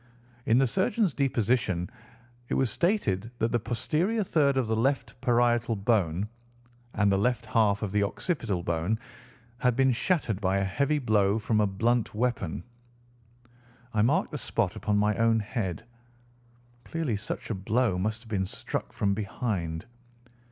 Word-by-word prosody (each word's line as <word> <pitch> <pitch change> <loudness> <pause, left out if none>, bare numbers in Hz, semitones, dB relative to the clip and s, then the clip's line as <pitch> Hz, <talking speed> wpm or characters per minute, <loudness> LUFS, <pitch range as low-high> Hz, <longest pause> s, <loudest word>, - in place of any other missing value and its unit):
In 115 - +5
the 135 - +5
surgeon's 190 - +1
deposition 115 -9 +1 0.6
it - - 0
was 130 -4 +2
stated 115 - 0
that 115 0 0
the 120 - +2
posterior 165 - 0
third 145 -7 +2
of 130 - +2
the 110 0 0
left 130 +2 -1
parietal 120 -2 +2
bone 100 -3 +1 0.7
and 100 -1 +3
the 95 - +2
left 125 +2 0
half 110 -2 +2
of 100 - -2
the 105 +1 +2
occipital 105 - -1
bone 85 +6 0 0.6
had 125 -3 +2
been 135 0 +4
shattered 120 - 0
by 95 0 +2
a 95 - +1
heavy 140 +10 +1
blow 105 -6 +2
from 110 0 +1
a 105 - +3
blunt 115 +4 0
weapon. 115 -9 -1 1.3
I 105 - +2
marked 150 - +2
the 150 - -4
spot 100 -6 -1
upon 105 -1 0
my 105 0 +2
own 115 0 +3
head. 105 -4 -3 1.0
Clearly 160 -9 -2
such 105 +2 -5
a - - +1
blow 105 0 0
must 110 +4 -2
have - - -17
been 95 -3 0
struck - - -5
from 100 -1 +1
behind. 95 -5 -3
110 Hz, 155 wpm, -28 LUFS, 100-125 Hz, 1.3 s, In